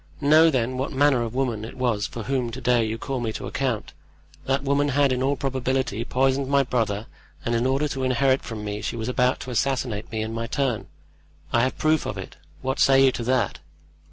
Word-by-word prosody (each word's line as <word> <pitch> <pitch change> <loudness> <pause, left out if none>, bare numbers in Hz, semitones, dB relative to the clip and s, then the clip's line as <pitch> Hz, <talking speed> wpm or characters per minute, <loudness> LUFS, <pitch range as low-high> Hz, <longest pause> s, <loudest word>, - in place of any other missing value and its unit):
Know, 155 +3 +6
then, 130 -2 0
what 135 - -2
manner 140 -2 +3
of 115 0 -4
woman 120 -5 -1
it 115 - -8
was 120 -5 0
for 115 - -7
whom 130 -1 -1
to 130 - -5
day 125 -2 +3
you 110 0 -2
call 135 +3 -3
me 115 -2 -2
to - - -6
account. 130 -6 -2 0.5
That 135 +1 0
woman 140 +1 +2
had, 140 -1 +3
in 125 - -1
all 135 +2 +2
probability, 130 -4 -1
poisoned 135 +2 +1
my 140 0 +3
brother, 110 -4 -1 0.4
and 115 - 0
in 120 +2 +1
order 135 +3 +1
to 135 -1 -3
inherit 130 +1 +2
from 110 -3 -6
me 105 0 -4
she 105 - -3
was 110 -1 -4
about 125 0 +2
to 130 - -6
assassinate 125 -3 -1
me 110 -1 -2
in 110 +1 -4
my 115 0 -3
turn. 125 -2 -1 0.7
I 120 - +4
have 130 +2 0
proof 155 0 +2
of - - -4
it. - - -8 0.3
What 130 0 -1
say 135 0 +6
you 130 - +5
to 120 - -4
that?" 125 -5 +1
130 Hz, 220 wpm, -24 LUFS, 115-135 Hz, 0.7 s, Know